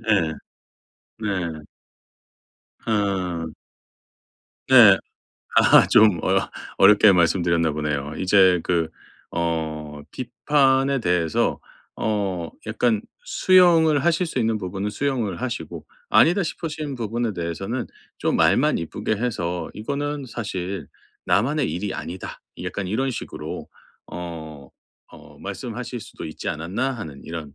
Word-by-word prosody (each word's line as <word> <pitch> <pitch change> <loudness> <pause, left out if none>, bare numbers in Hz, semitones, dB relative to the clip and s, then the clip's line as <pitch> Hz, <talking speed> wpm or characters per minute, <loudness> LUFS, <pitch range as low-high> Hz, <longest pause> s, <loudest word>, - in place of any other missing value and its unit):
예. 85 -7 +3 0.9
네. 85 -8 -3 1.2
어. 95 -7 -1 1.2
네. - - +9 0.6
아하 - - +7
좀 105 -6 +5
어 - - +1 0.3
어렵게 105 +1 +7
말씀드렸나 85 -2 +2
보네요. 75 -1 -3
이제 95 -2 +4
그 85 -3 0 0.5
어 80 -3 -3
비판에 135 +2 +1
대해서 85 -5 +1 0.4
어 95 -6 -2 0.2
약간 110 0 +1 0.2
수용을 170 - +4
하실 170 +1 +2
수 160 - -4
있는 110 -2 +1
부분은 95 +2 -4
수용을 120 -5 -2
하시고 125 -2 -5 0.2
아니다 175 +3 +4
싶으신 155 -3 -4
부분에 115 -1 -2
대해서는 95 +7 -4 0.3
좀 - - 0
말만 - - +3
이쁘게 105 +6 -3
해서 90 -7 -2
"이거는 140 +5 -3
사실 95 - -4 0.4
나만의 135 +7 +1
일이 95 +2 -3
아니다." 90 +2 -7 0.2
약간 100 -2 -4
이런 130 +8 0
식으로 120 - -6 0.4
어, 80 -5 -8 0.4
어 - - -15
말씀하실 120 +1 -5
수도 110 - -10
있지 80 - -6
않았나 95 - -2
하는 80 - -8
이런 80 -4 -7
100 Hz, 235 characters per minute, -23 LUFS, 85-125 Hz, 1.2 s, 네